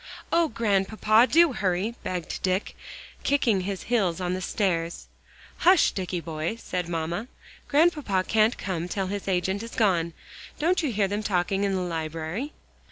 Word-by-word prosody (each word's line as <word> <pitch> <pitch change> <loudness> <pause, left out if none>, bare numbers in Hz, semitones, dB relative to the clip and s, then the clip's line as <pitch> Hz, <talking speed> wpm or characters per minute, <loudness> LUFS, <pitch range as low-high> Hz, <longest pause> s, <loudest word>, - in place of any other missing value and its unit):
"Oh, 335 -1 +4
Grandpapa! 215 0 +3
do 335 -3 +5
hurry," 195 +2 0
begged 180 -3 -4
Dick, 185 +2 -1 0.5
kicking 235 -8 +2
his 195 0 -4
heels 195 -8 +1
on 180 -1 -1
the 185 - -3
stairs. 175 -3 -1 0.5
"Hush, 365 -1 +5
Dicky 185 -2 -3
boy," 160 +3 -3
said 180 -6 -4
mamma. 170 +6 -2 0.4
"Grandpapa 295 - +2
can't 220 +1 +3
come 180 -3 -3
till 195 +2 -2
his 200 -1 -5
agent 190 +1 0
is 230 0 -8
gone. 170 -6 +2 0.4
Don't 350 +4 +2
you 300 -5 -1
hear 205 -2 +1
them 205 +2 -2
talking 195 -1 0
in 195 -1 +1
the 185 - -1
library?" 165 - -3
195 Hz, 155 wpm, -26 LUFS, 180-230 Hz, 0.5 s, do